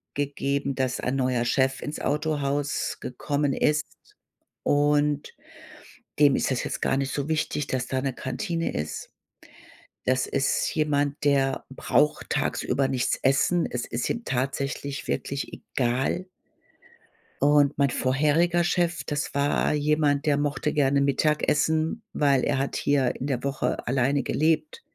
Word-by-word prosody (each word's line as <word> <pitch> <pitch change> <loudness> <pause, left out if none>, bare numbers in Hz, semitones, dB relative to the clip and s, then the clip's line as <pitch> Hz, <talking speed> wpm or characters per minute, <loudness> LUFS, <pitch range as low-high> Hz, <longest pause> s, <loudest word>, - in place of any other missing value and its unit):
gegeben, 140 -1 -1
dass 130 -1 -1
ein 125 +2 -1
neuer 125 -2 +1
Chef 130 +2 +1
ins 150 - -5
Autohaus 145 -1 -1
gekommen 140 +2 -1
ist 150 +1 +1 0.8
und 145 0 +2 0.9
dem 145 -2 +6
ist - - 0
das 125 - 0
jetzt - - -4
gar 135 - +2
nicht 135 -1 -1
so 140 0 -2
wichtig, 155 -2 -1
dass 125 -1 -2
da 130 - -1
'ne 135 -2 -2
Kantine 165 +7 -3
ist. 75 +1 -4 1.0
Das 130 0 +2
ist 140 0 0
jemand, 145 -2 0
der 135 -2 +2
braucht 150 +2 +1
tagsüber 135 -1 0
nichts 130 -1 0
essen. 135 +6 +3
Es 125 -1 -3
ist 120 0 -3
ihm 235 -1 -3
tatsächlich 140 +2 -3
wirklich 140 0 -3
egal. 130 +9 -1 1.2
Und 145 -1 +4
mein 140 -1 +4
vorheriger 155 +7 +2
Chef, 175 -1 0
das 145 -1 -3
war 140 +1 +1
jemand, 150 0 +1
der 145 -1 +3
mochte 145 +1 -1
gerne 140 -1 +3
Mittagessen, 155 - +1
weil 140 -3 +3
er 135 -2 +1
hat 135 - -2
hier 140 -3 +1
in 130 - -5
der 135 -3 -2
Woche 140 -3 -2
alleine 135 +2 +2
gelebt 165 - 0
140 Hz, 135 wpm, -26 LUFS, 135-150 Hz, 1.2 s, dem